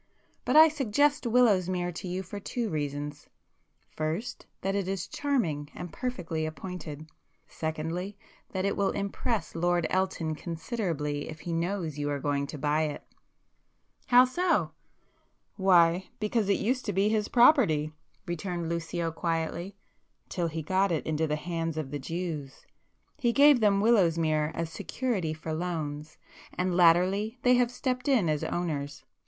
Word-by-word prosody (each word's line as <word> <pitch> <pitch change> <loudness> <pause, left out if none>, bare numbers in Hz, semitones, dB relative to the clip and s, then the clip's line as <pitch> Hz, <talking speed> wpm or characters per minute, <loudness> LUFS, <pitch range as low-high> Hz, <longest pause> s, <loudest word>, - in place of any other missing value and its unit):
But - - +1
I 315 +1 +10
suggest 290 -1 +1
Willowsmere 185 -7 +3
to 185 +3 -6
you 185 +2 -3
for 200 +3 -7
two 225 +1 -3
reasons,—first 150 - -6
that 195 - -1
it 200 -2 -1
is 190 -2 -3
charming 175 - -1
and 175 -2 -7
perfectly 170 -11 -3
appointed; 155 -1 -7 0.4
secondly, 165 +5 -4 0.3
that 190 0 -2
it 200 - 0
will 200 - +1
impress 200 +3 -2
Lord 175 0 +1
Elton 185 -4 0
considerably 160 - -3
if 155 -1 -8
he 170 - -4
knows 165 -3 -2
you 145 0 -1
are 145 - -1
going 140 0 -1
to 150 - -7
buy 150 +2 +1
it." 150 - -5 1.0
"How 250 +1 +7
so?" 255 - +1 0.8
"Why, 180 -1 +4
because 215 -1 0
it 200 - +3
used 250 +4 0
to 205 - -1
be 195 +3 +2
his 215 -1 +1
property"—returned 175 - +1
Lucio 170 0 -2
quietly—"till 170 +2 -4
he 160 0 -4
got 190 +4 +1
into 160 0 0
the 150 - 0
hands 165 0 -3
of 145 -4 -4
the 145 - -3
Jews. 155 -2 -5 0.5
He 240 -4 +2
gave 285 +1 +6
them 200 -3 +3
Willowsmere 165 -8 +3
as 165 -1 -3
security 195 -12 -2
for 155 0 -5
loans, 155 -3 -4 0.4
and 180 -1 0
latterly 185 +6 +4
they 250 - +5
have 245 -1 +3
stepped 255 +1 -3
in 235 - +3
as 150 -1 0
owners. 145 -5 -3
175 Hz, 140 wpm, -28 LUFS, 155-205 Hz, 1.0 s, I